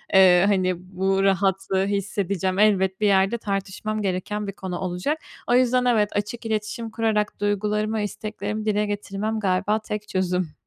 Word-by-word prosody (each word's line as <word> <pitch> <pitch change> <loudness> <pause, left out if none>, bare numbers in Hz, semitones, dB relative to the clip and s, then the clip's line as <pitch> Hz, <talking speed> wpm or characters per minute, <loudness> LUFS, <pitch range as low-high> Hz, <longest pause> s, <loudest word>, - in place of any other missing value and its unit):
ııı, 185 -1 +7
hani 185 -2 +2 0.2
bu 195 +1 +2
rahatlığı 195 0 +1
hissedeceğim. 200 -1 -1
Elbet 190 -3 +3
bir 210 - +4
yerde 195 +3 +3
tartışmam 205 +1 -3
gereken 200 +2 -2
bir 195 - -4
konu 185 -2 -5
olacak. 185 - -2 0.3
O 240 - +3
yüzden 250 0 +3
evet, 220 -4 +3
açık 210 +3 -3
iletişim 220 +1 -3
kurarak 220 -2 0
duygularımı, 210 +1 0
isteklerimi 215 0 -4
dile 210 -1 +1
getirmem 205 +1 -3
galiba 200 +2 +1
tek 210 -1 -5
çözüm. 180 -3 -1
205 Hz, 145 wpm, -24 LUFS, 190-215 Hz, 0.3 s, ııı